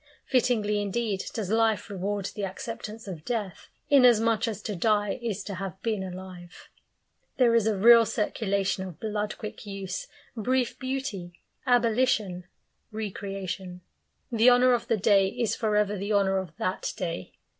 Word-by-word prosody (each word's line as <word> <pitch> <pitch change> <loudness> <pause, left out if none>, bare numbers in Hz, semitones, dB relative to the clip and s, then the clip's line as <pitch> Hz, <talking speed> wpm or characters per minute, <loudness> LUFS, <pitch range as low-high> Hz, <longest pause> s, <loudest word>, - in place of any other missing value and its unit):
Fittingly 215 -5 +1
indeed 205 -1 -1
does 210 -4 -3
life 225 -1 +2
reward 200 0 -3
the 205 - -5
acceptance 215 +2 -6
of 170 -5 -7
death, 215 -5 -4 0.2
inasmuch 240 -5 +5
as 210 -2 -4
to 210 - -3
die 205 +3 +1
is 215 -4 -3
to 200 - -6
have 190 0 -6
been 220 -4 -1
alive. 180 -1 -9 0.7
There 245 -3 +4
is 230 -2 +3
a 215 -2 +1
real 230 +2 +7
circulation 200 -3 -1
of 180 -4 -9
blood 210 -1 -3
quick 215 - -7
use, 195 -2 -5 0.3
brief 250 +2 0
beauty, 255 -10 -4 0.3
abolition, 230 -6 +2 0.5
recreation. 195 -4 -5 0.5
The 230 +1 +6
honour 250 +1 +5
of 235 -1 -1
the 225 - +2
day 195 -1 +4
is 230 +2 -1
for 215 -2 0
ever 210 0 +2
the 200 +2 -2
honour 195 -1 +3
of 175 -5 -8
that 185 - -2
day. 165 - -4
210 Hz, 150 wpm, -27 LUFS, 190-230 Hz, 0.7 s, real